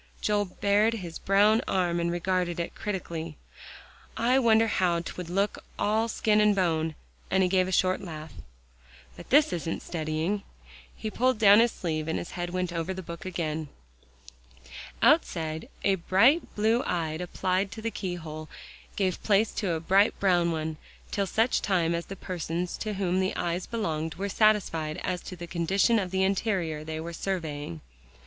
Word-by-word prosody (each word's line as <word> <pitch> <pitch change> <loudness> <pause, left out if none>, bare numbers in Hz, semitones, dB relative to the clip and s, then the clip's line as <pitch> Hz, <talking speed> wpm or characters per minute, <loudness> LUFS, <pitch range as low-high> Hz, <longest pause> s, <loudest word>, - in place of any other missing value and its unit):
'" - - -30
Joel 205 -1 +1
bared 205 +4 +2
his 175 -6 -7
brown 205 +3 +4
arm 175 -2 +1
and 170 0 0
regarded 175 0 -1
it 170 - -3
critically. 165 -6 -5 0.8
"I 250 +3 +3
wonder 225 -2 +5
how 180 -5 +1
'twould 175 0 -7
look 195 +3 -1
all 220 +2 +1
skin 215 -1 +2
and 210 -1 +4
bone," 160 -4 0 0.3
and 190 0 +3
he 180 - +2
gave 185 0 +3
a - - -3
short 185 0 +2
laugh. 155 -4 -8 0.8
"But - - -12
this 295 +3 +5
isn't 165 -1 -3
studying." 160 +4 -2 0.5
He 215 - -5
pulled 255 +2 +2
down 205 -1 +7
his 235 0 +4
sleeve, 155 -3 -3
and 160 - -1
his - - -6
head 175 -1 -4
went 180 -1 -2
over 170 +2 -2
the 190 - -6
book 170 +1 -8
again. 160 -4 -3 1.3
Outside, 155 - +2
a 195 - +4
bright 210 - +3
blue 220 +3 +2
eye 165 -7 -1
applied 185 +3 -1
to 220 - -8
the 230 - -1
keyhole, 160 -6 -5 0.5
gave 185 -3 0
place 210 +1 +3
to 195 -6 -1
a 160 - -1
bright 195 +6 +3
brown 175 -3 +3
one, 160 -1 -3 0.3
till 200 -2 0
such 225 +6 +2
time 170 -4 +1
as 170 0 -3
the 195 - -6
persons 175 -1 -3
to 215 -2 -3
whom 185 -1 0
the 190 0 0
eyes 175 +1 -2
belonged, 160 -9 -2
were 200 +2 -3
satisfied 190 -8 +2
as 180 -2 -2
to 185 - -8
the 175 0 -7
condition 190 +7 +2
of 190 -3 -2
the 190 +1 +1
interior 190 -6 0
they 160 0 -5
were 170 +1 -6
surveying. 155 - -4
185 Hz, 170 wpm, -28 LUFS, 165-205 Hz, 1.3 s, down